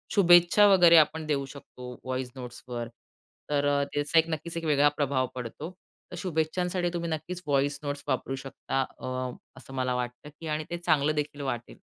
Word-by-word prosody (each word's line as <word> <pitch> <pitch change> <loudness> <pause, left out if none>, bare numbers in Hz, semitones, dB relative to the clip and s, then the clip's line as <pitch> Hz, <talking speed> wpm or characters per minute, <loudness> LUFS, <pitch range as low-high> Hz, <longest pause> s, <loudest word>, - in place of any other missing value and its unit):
शुभेच्छा 175 +1 +7
वगैरे 175 -4 +7
आपण 155 0 +3
देऊ 140 -3 0
शकतो, 130 -2 -11
व्हॉईस 130 -1 -3
नोट्सवर. 125 -1 -6 0.6
तर 145 -1 +1
अ, 140 0 +2
त्याचा 145 +3 +3
एक 165 +1 +1
नक्कीच 165 +1 -4
एक 165 - -4
वेगळा 145 -1 +4
प्रभाव 135 -3 +1
पडतो. 125 +8 -6 0.4
तर - - -6
शुभेच्छांसाठी 175 +1 -1
तुम्ही 170 -1 -2
नक्कीच 165 +3 -4
व्हॉईस 140 0 +1
नोट्स 145 0 -4
वापरू 135 0 -1
शकता 135 0 -3 0.2
अ, - - -6 0.5
असं 135 0 -12
मला 130 -1 -1
वाटतं, 125 +3 -5
की 165 - -7
आणि 155 0 -1
ते 175 - -3
चांगलं 155 -3 +2
देखील 150 -1 -3
वाटेल. 120 -4 -4
145 Hz, 170 wpm, -28 LUFS, 135-165 Hz, 0.6 s, शुभेच्छा